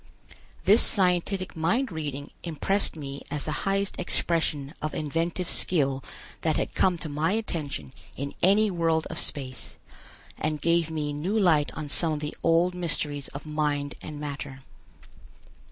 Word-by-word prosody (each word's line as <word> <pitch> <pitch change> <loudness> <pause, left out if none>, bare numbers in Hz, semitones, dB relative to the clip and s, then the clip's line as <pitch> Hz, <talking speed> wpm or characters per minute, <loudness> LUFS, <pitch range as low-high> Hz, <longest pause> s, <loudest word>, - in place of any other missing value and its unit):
This 210 +4 +8
scientific 185 0 +4
mind 225 +11 +1
reading 145 -3 -5
impressed 175 +5 0
me 140 -2 -6
as 150 -1 -3
the 155 - -2 0.2
highest 195 0 -1
expression 150 -4 0
of 155 0 -3
inventive 165 +4 -1
skill 135 -9 +3 0.4
that - - +1
had - - -2
come 180 -2 +3
to 165 - -4
my 155 +5 0
attention 150 - -3 0.2
in 140 +1 -4
any 205 +3 +4
world 165 -2 +1
of - - -2
space, 130 -3 -3 0.6
and 155 -1 -1
gave 170 +1 +2
me 150 -2 -2
new 175 +9 -1
light 165 -8 +3
on 155 -1 -5
some 160 +3 +1
of 150 - -2
the 150 0 -5
old 170 +2 +3
mysteries 150 -5 -2
of 140 - -9
mind 150 -2 -1
and 150 -1 -7
matter. 140 -2 -6
155 Hz, 150 wpm, -27 LUFS, 145-175 Hz, 0.6 s, This